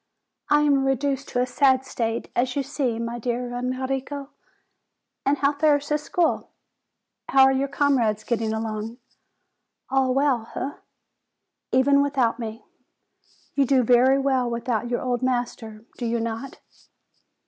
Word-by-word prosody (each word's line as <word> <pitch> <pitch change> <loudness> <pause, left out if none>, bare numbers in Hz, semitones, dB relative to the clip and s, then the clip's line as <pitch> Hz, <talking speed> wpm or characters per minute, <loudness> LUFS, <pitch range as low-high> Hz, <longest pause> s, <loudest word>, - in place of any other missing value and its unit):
I 295 0 +5
am 285 -2 +3
reduced 270 0 0
to 245 - -1
a - - 0
sad 260 0 +2
state, 230 -3 -3
as 250 +1 0
you 280 - 0
see, 265 -4 -2
my 235 +1 -4
dear 245 +1 -3
Enrico. 265 +3 -3 1.0
And 285 +1 +3
how 280 +1 +2
fares 290 -1 +2
the 300 0 +1
school? 345 +3 0 0.8
How 270 -1 +6
are 265 - +6
your 270 +1 0
comrades 260 -7 +1
getting 225 -2 -1
along? 220 +1 -4 0.9
All 265 -1 +2
well, 270 -5 +1
eh? 275 - -2 1.0
Even 280 +2 +4
without 265 -5 +1
me? 225 -1 -6 0.9
You 280 - +3
do 260 -1 +4
very 250 +3 +5
well 265 -3 +1
without 235 -1 -2
your 240 - -1
old 250 -1 -1
master, 240 -3 -3
do 240 - -2
you 235 0 0
not?" 230 +3 -5
255 Hz, 140 wpm, -24 LUFS, 235-275 Hz, 1.0 s, How